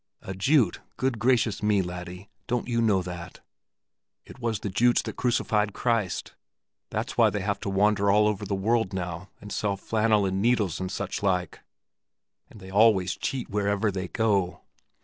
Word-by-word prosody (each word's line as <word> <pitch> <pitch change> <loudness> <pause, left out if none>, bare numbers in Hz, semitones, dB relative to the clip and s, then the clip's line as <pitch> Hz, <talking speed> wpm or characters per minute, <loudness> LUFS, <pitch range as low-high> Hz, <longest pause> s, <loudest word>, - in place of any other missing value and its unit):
"A 95 - -5
Jute? 110 - +2 0.2
Good 130 -3 -1
gracious 120 -2 +2
me, 105 -2 +2
laddie, 90 +2 -7 0.2
don't 125 -1 -1
you 115 -1 0
know 100 -5 +2
that? 90 -1 -8 0.8
It - - -13
was 115 -4 -2
the 100 - -3
Jutes 120 +5 +3
that - - -6
crucified 110 -4 +1
Christ. 115 -7 -1 0.6
That's - - -3
why - - +6
they 105 - -3
have 100 0 -1
to - - -4
wander 100 +1 +2
all 105 +1 +5
over 105 -1 -1
the 100 0 -2
world 110 +1 +1
now, 90 0 -4
and 105 - -10
sell 100 -2 -1
flannel 110 0 +1
and 95 0 -1
needles, 110 -6 +1
and 95 0 -3
such 100 -1 -4
like; 90 -4 0 0.9
and 110 - -14
they 95 -1 -11
always 100 -3 +4
cheat 130 -5 -4
wherever 100 +1 +1
they 95 -1 -4
go. 100 -4 0
100 Hz, 170 wpm, -26 LUFS, 95-110 Hz, 0.9 s, why